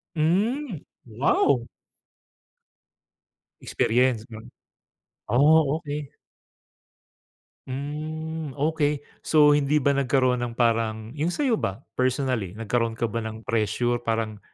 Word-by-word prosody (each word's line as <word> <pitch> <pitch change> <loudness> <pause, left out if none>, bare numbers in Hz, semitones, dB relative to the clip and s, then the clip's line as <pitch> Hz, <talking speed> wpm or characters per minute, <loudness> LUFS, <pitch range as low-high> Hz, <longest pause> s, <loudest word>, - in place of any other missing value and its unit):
Mm, 195 - 0 0.2
wow! 120 +1 +1 1.9
Experience 120 -1 +1
no? 110 -1 -9 0.9
Oh, 150 +3 +4
okey. 150 -3 -5 1.6
Mm, 155 +2 -5
okey. 150 -1 0 0.2
So 150 -2 +6
hindi 145 +1 +2
ba 140 - +4
nagkaroon 130 -2 +2
ng 120 - -6
parang 115 -2 0
yung 155 +3 0
sayo 260 -7 +1
ba? 100 +8 -3
Personally, 130 -7 0
nagkaroon 115 +1 -1
ka 115 0 -1
ba 115 - -2
ng 110 0 -6
pressure 115 +3 0
parang 110 -2 -2
130 Hz, 100 wpm, -25 LUFS, 115-150 Hz, 1.9 s, So